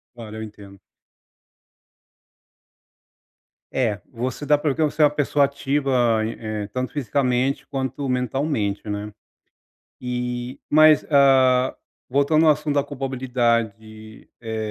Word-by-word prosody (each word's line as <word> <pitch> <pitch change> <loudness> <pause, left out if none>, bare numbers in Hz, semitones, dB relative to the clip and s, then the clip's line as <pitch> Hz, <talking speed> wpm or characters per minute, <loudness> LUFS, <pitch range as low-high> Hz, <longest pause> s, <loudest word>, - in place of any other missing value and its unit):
Olha, 110 -2 -9
eu 110 - -5
entendo. 100 -2 -12 2.9
É, 110 -6 -1
você 130 +4 -5
dá, 150 0 +4
porque 150 +1 -1
você 155 0 0
é - - +8
uma 145 - +3
pessoa 145 -1 +1
ativa, 140 0 -1 0.3
eh, 110 -2 -5
tanto 125 +4 -4
fisicamente 135 -1 0
quanto 135 0 -3
mentalmente, 125 -5 -1
né. 105 +1 -5 0.9
Eh, 125 +1 -4
mas 155 0 +6
ah, 130 -2 +4 0.3
voltando 140 +4 +3
ao 155 - +7
assunto 150 0 -3
da 140 - +3
culpabilidade, 115 -5 -3
eh, 110 -2 -5
130 Hz, 110 wpm, -22 LUFS, 115-140 Hz, 2.9 s, é